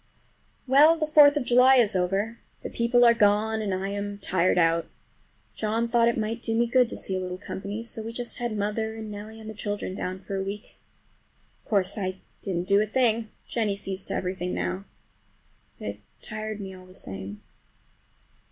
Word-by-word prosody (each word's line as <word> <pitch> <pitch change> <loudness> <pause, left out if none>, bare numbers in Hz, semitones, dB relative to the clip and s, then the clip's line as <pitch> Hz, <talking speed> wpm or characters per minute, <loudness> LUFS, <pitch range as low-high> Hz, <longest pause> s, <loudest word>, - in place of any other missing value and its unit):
Well, 295 +5 +6
the 315 - 0
Fourth 295 -1 +7
of 290 - 0
July 250 +2 +6
is 230 -6 +4
over! 195 +5 0 0.2
The - - -6
people 240 +1 +3
are 235 - +7
gone 220 0 +2
and 205 -2 -2
I 190 +1 -2
am 200 0 -4
tired 185 -3 +1
out. 165 -1 +3 0.7
John 225 +2 -1
thought 235 0 +3
it 235 - +1
might 225 +1 -2
do 225 -1 -1
me 235 +1 +3
good 245 0 +3
to - - -6
see 190 - -3
a - - -1
little 180 0 -4
company, 200 +3 -5
so 230 -1 -4
we 225 +1 -5
just 240 +1 -3
had 240 -3 -3
mother 220 +2 -2
and 220 -1 -7
Nellie 215 +2 -8
and 220 - -10
the 220 - -6
children 205 -2 -4
down 185 -1 -4
for 195 +1 -6
a - - -1
week. 205 +3 -7 0.8
Of - - -26
course 200 -1 +1
I 185 -1 -3 0.2
didn't 180 -2 -3
do 200 +1 +5
a 215 - 0
thing. 230 -1 +1 0.2
Jennie 215 -4 0
sees 195 -1 -4
to - - -3
everything 180 -1 -2
now. 90 +2 -3 0.9
But - - -7
it 100 0 -7 0.2
tired 215 0 -5
me 190 -2 -6
all 185 0 -13
the 185 - -16
same. 95 - -7
210 Hz, 200 wpm, -26 LUFS, 190-230 Hz, 0.9 s, Fourth